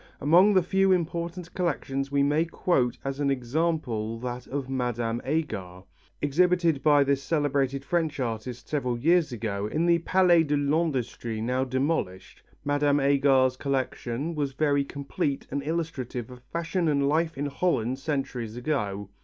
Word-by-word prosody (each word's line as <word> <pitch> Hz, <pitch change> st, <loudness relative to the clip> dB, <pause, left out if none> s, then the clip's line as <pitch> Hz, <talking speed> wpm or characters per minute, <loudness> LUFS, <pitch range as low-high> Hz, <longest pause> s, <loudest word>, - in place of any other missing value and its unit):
Among 180 Hz, +8 st, +5 dB
the 185 Hz, -, +5 dB
few 195 Hz, +2 st, +2 dB
important 170 Hz, 0 st, -2 dB
collections 140 Hz, -6 st, -2 dB
we 140 Hz, 0 st, +3 dB
may 150 Hz, +3 st, +2 dB
quote 135 Hz, -7 st, 0 dB
as 135 Hz, 0 st, -3 dB
an 145 Hz, -1 st, +1 dB
example 125 Hz, -4 st, -1 dB
that 125 Hz, 0 st, -5 dB
of 140 Hz, -1 st, -4 dB
Mme. 120 Hz, -3 st, -2 dB
Agar, 105 Hz, -, -3 dB, 0.4 s
exhibited 170 Hz, 0 st, +2 dB
by 145 Hz, -2 st, +5 dB
this 140 Hz, 0 st, +1 dB
celebrated 140 Hz, -3 st, 0 dB
French 160 Hz, -3 st, -1 dB
artist 120 Hz, 0 st, -4 dB
several 125 Hz, -5 st, -1 dB
years 165 Hz, +3 st, +3 dB
ago 105 Hz, -3 st, -3 dB
in 155 Hz, +9 st, 0 dB
the 170 Hz, -1 st, +4 dB
Palais 175 Hz, 0 st, +4 dB
de 150 Hz, -2 st, 0 dB
l'Industrie 140 Hz, -6 st, -1 dB
now 125 Hz, +4 st, 0 dB
demolished. 130 Hz, -, -2 dB, 0.2 s
Mme. 145 Hz, 0 st, +2 dB
Agar's 135 Hz, -2 st, +3 dB
collection 135 Hz, +1 st, -2 dB
was 145 Hz, -3 st, -2 dB
very 145 Hz, 0 st, +2 dB
complete 140 Hz, 0 st, -3 dB
and 140 Hz, -, -1 dB
illustrative 140 Hz, -6 st, -4 dB
of 125 Hz, 0 st, -12 dB
fashion 170 Hz, +1 st, -1 dB
and 140 Hz, -2 st, +2 dB
life 160 Hz, +1 st, +1 dB
in 145 Hz, -, -2 dB
Holland 135 Hz, -4 st, 0 dB
centuries 135 Hz, -6 st, -3 dB
ago. 105 Hz, -8 st, -2 dB
140 Hz, 145 wpm, -27 LUFS, 125-160 Hz, 0.4 s, Among